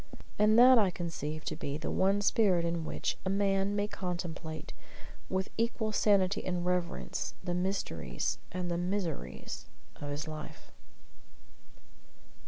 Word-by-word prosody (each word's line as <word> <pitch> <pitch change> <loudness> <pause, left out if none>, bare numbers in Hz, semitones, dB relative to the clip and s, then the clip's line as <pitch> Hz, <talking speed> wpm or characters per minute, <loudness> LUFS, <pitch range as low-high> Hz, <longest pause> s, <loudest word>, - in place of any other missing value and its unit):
And 215 +1 +5
that 250 0 +9
I 200 -3 +4
conceive 155 -3 -4
to 155 - -2
be 145 -2 -3
the 160 - -3
one 195 +2 +3
spirit 195 -5 +3
in 170 -1 -1
which - - -2
a 190 - -1
man 195 0 +2
may 205 0 +1
contemplate, 175 -5 -5 0.6
with 190 0 -1
equal 230 -1 0
sanity 200 -2 +3
and 180 -1 -1
reverence, 175 - -1
the 175 -1 -1
mysteries 175 - -1
and 180 0 -2
the 170 - 0
miseries 170 - -3 0.3
of 145 - -6
his 145 +2 -4
life. 155 -1 -8
180 Hz, 135 wpm, -32 LUFS, 160-200 Hz, 0.6 s, that